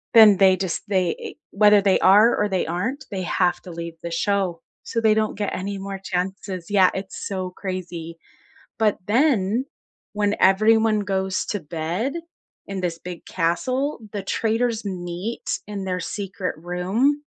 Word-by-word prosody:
Then 215 -3 +8
they 190 -1 +5
just 190 -3 -2
they 185 -4 -1
whether 210 0 +6
they 195 -1 +3
are 210 +5 +6
or 210 - 0
they 190 -2 0
aren't, 230 - -3
they 195 -2 -3
have 175 0 +1
to 180 - -10
leave 170 0 -6
the 170 - -5
show, 185 -1 0 0.2
so 230 - -2
they 220 -1 +4
don't 215 -1 0
get 205 -1 -2
any 200 +1 -4
more 195 0 -6
chances. 185 0 -3
Yeah, 195 -3 +5
it's 190 0 -6
so 185 -2 -3
crazy. 180 -3 -6 0.6
But 215 -2 +2
then, 230 -2 +2 0.5
when 210 0 0
everyone 215 +3 +4
goes 190 -1 -1
to 205 - -2
bed 170 - -3 0.5
in 195 -1 -4
this 170 -2 -2
big 175 -1 -8
castle, 255 - -1
the 205 - -3
traitors 225 +3 0
meet 185 +3 -4
in 205 -2 -5
their 180 -1 -2
secret 195 0 -4
room, 190 - 0
195 Hz, 155 wpm, -23 LUFS, 180-215 Hz, 0.6 s, Then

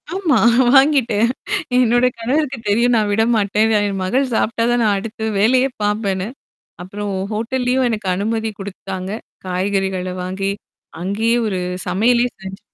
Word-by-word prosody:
ஆமா. 330 - +2 0.4
வாங்கிட்டேன். 245 -6 +4 0.5
என்னோட 245 0 +3
கணவருக்கு 265 +3 -1
தெரியும். 240 +4 +3
நான் 210 -2 +1
விடமாட்டேன். 220 0 +2
என் 200 -2 -1
மகள் 255 +6 0
சாப்பிட்டா 230 +1 0
தான், 240 -1 +2
நான் 205 -2 +3
அடுத்த 220 +2 -4
வேலையே 255 +5 +3
பார்ப்பேன்னு 205 -2 -1 0.5
அப்புறம், 200 +2 -5 0.2
ஹோட்டல்லயும் 250 +3 0
எனக்கு 210 -4 -3
அனுமதி 220 +3 -1
குடுத்தாங்க. 190 -1 -6 0.4
காய்கறிகள 185 0 -1
வாங்கி, 195 +2 -2 0.5
அங்கயே 220 +5 0
ஒரு 190 -3 -2 0.3
சமையலே 235 +6 +2 0.2
செஞ்சு 190 0 -8
220 Hz, 120 wpm, -19 LUFS, 195-240 Hz, 0.5 s, வாங்கிட்டேன்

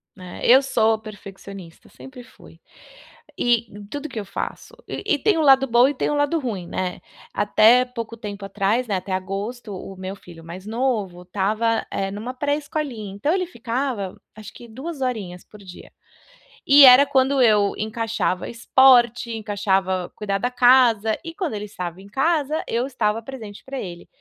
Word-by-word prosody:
Né? 180 -2 -10
Eu 260 +3 +7
sou 225 -4 +1
perfeccionista, 195 -4 -12
sempre 260 -2 -12
fui, 255 - -18 0.8
e 235 -2 +1 0.2
tudo 290 +1 -5
que 235 - -5
eu 205 - -6
faço, - - -6
e - - -6
e - - -6
tem 410 +2 +2
o - - +1
lado 270 -2 +5
bom 240 +2 +5
e 290 - -1
tem - - -1
o 295 - 0
lado 290 +3 +1
ruim, 220 - -4
né. 180 0 -4 0.3
Até 220 +4 +4
pouco 230 -2 -7
tempo 205 -2 -7
atrás, 210 +5 0
né, 200 - -1
até 185 +1 -7
agosto, 200 +4 -5
o 190 +1 -9
meu 190 +1 -6
filho 170 -4 -14
mais 175 +3 -10
novo 220 -7 -2
estava, 215 +5 -1
eh, 195 0 -2
numa 220 +5 -6
pré-escolinha, 285 -6 -3
então 285 +10 -1
ele 370 -1 0
ficava, 235 - -4 0.2
acho 215 0 -11
que 240 - -13
2 270 +6 -8
horinhas 205 -9 -4
por 210 - -16
dia, 185 -2 -13 0.8
e 280 +1 +8
era 260 +2 +9
quando 270 0 +2
eu 210 -3 +4
encaixava 220 -3 -2
esporte, 240 0 +4
encaixava 195 -4 -1
cuidar 200 -2 -2
da 245 +4 -1
casa, 245 -4 +4
e 330 - -6
quando 345 - -3
ele 210 0 -4
estava 180 -3 -7
em 200 - -14
casa, 305 +5 0
eu 235 +3 -1
estava 225 -4 -1
presente 225 -5 -10
pra 270 -1 -6
ele. 175 -2 -8
225 Hz, 170 wpm, -22 LUFS, 200-260 Hz, 0.8 s, era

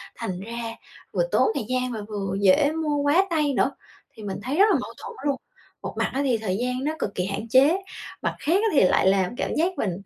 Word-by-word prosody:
thành 180 -1 -4
ra 230 +2 -5 0.4
vừa - - +2
tốn - - +4
thời - - -2
gian 255 0 0
mà 220 -3 -4
vừa 195 -2 -3
dễ 200 +10 +5
mua 315 -2 -1
quá 290 +7 +3
tay 300 -4 +1
nữa. - - +2 0.4
Thì 220 - -12
mình 195 -2 -4
thấy 270 +5 -2
rất 400 - +7
là - - +4
mâu - - -7
thuẫn 470 - -7
luôn, 280 -2 +2 0.5
một - - -5
mặt - - +1
á 275 - 0
thì 255 -4 +2
thời 200 -4 -2
gian 250 +2 -2
nó 300 - 0
cực 200 - -3
kỳ 180 - -1
hạn 200 +4 -4
chế. 275 +9 +5 0.4
Mặt - - -1
khác 320 - 0
á, 435 +3 +3
thì 285 - +5
lại 185 - +3
làm 190 +3 +2
cảm - - -2
giác 345 +3 0
mình 190 - 0
250 Hz, 245 wpm, -24 LUFS, 205-295 Hz, 0.5 s, rất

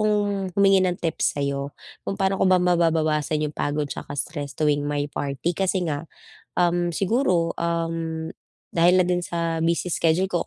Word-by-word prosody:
kong 205 -2 +1
humingi 195 -1 +5
ng 180 -1 0
tips 165 -2 0
sa'yo 140 0 -2 0.3
kung 195 - -2
paano 195 0 +2
ko - - +4
ba 185 - +6
mababawasan 160 -4 +2
'yung 150 - -11
pagod 145 0 -1
'tsaka - - -7
stress 145 0 -4
tuwing 145 -1 +1
may 145 0 -1
party 145 +4 -3
kasi 190 -1 +1
nga, 145 +1 -3 0.5
um, 175 0 +2
siguro, 185 -5 +1
um, 165 -1 -2 0.4
dahil 175 +2 +4
na - - -2
din 180 0 +1
sa 165 -1 -2
busy 170 +2 +1
schedule 170 +4 +2
ko 175 - 0
170 Hz, 165 wpm, -24 LUFS, 150-180 Hz, 0.5 s, ba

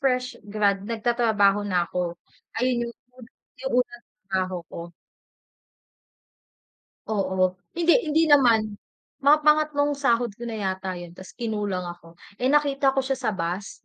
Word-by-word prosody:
fresh 255 -2 +1 0.2
grad, 205 -2 +3
nagtatrabaho 220 -3 +2
na 180 -2 +2
ako. 175 -1 -3 0.4
Ayun 240 -1 0
yung, 235 - -10 0.7
yung 265 0 -3
unang 240 0 -15 0.3
trabaho 185 -1 0 0.2
ko. - - -7 2.3
Oo, 190 -3 +1 0.2
hindi 340 0 +4
hindi 310 +2 +3
naman, 245 -6 +6 0.6
mga 295 +2 +7
pangatlong 300 -1 +3
sahod 240 -5 +1
ko 235 +3 -7
na 225 - -4
yata 190 -2 -3
'yun, 175 -1 -9
ta's 185 +1 -13
kinulang 210 -6 -2
ako 175 -1 -10 0.2
eh, 255 - +2
nakita 280 -2 +2
ko - - +4
siya 270 0 -1
sa 235 - 0
bus 175 +3 -4
230 Hz, 135 wpm, -25 LUFS, 190-265 Hz, 2.3 s, mga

